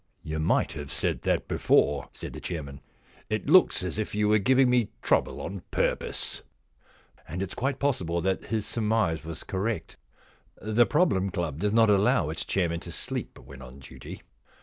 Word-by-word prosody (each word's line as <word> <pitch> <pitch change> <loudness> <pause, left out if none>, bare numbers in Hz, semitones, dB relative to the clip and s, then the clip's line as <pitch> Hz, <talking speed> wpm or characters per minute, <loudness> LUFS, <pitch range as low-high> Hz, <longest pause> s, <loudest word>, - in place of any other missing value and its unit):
* - - -42
You 80 - -1
might 80 - +2
have 75 -3 -7
said - - -1
that - - 0
before,' 70 -1 +2
said - - -7
the - - -8
chairman. 70 -6 -6 0.3
* - - -29
It 110 +3 -2
looks 180 - +5
as 90 +3 -3
if 110 - -3
you 105 0 +2
were 110 0 +5
giving 130 +5 +4
me 125 -3 +2
trouble - - +1
on 100 -1 -5
purpose.' - - -2 0.9
And 85 +4 -5
it 95 - -4
is - - -7
quite 135 +2 -1
possible 90 -12 0
that 95 +2 -1
his 110 -1 -2
surmise 105 -8 0
was 80 0 -6
correct. 105 +3 -3 0.6
The 110 +3 +3
Problem 105 - +2
Club 85 -5 -3
does 105 +3 +1
not 110 -1 +5
allow 105 - +3
its 80 - -4
chairman 85 -3 0
to - - -8
sleep - - -4
when 65 +1 -12
on 65 0 -11
duty. 70 - -11
95 Hz, 185 wpm, -27 LUFS, 80-110 Hz, 0.9 s, looks